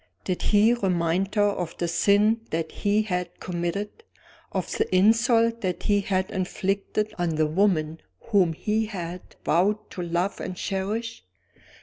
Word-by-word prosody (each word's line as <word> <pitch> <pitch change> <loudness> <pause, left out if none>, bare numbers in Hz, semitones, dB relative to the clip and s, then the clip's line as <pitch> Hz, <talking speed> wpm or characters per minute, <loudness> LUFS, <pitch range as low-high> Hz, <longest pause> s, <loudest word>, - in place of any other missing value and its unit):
Did 185 - -2
he 215 +3 +4
remind 185 -2 0
her 205 - +4
of 175 -4 -5
the 175 - -1
sin 205 +6 +3
that 160 0 -2
he 210 +1 +1
had 180 -4 -3
committed? 180 - -3 0.5
of - - -3
the - - 0
insult 230 +3 +4
that 185 -2 -2
he 205 -1 +2
had 190 0 -1
inflicted 195 +3 -2
on 170 -2 0
the 155 0 +2
woman 160 -2 +1 0.2
whom 195 -7 +2
he 215 +6 -1
had 180 -3 -7
vowed 205 +5 +1
to 180 - -5
love 175 +3 -1
and 185 - -5
cherish? 210 +5 -3
195 Hz, 145 wpm, -25 LUFS, 175-210 Hz, 0.5 s, he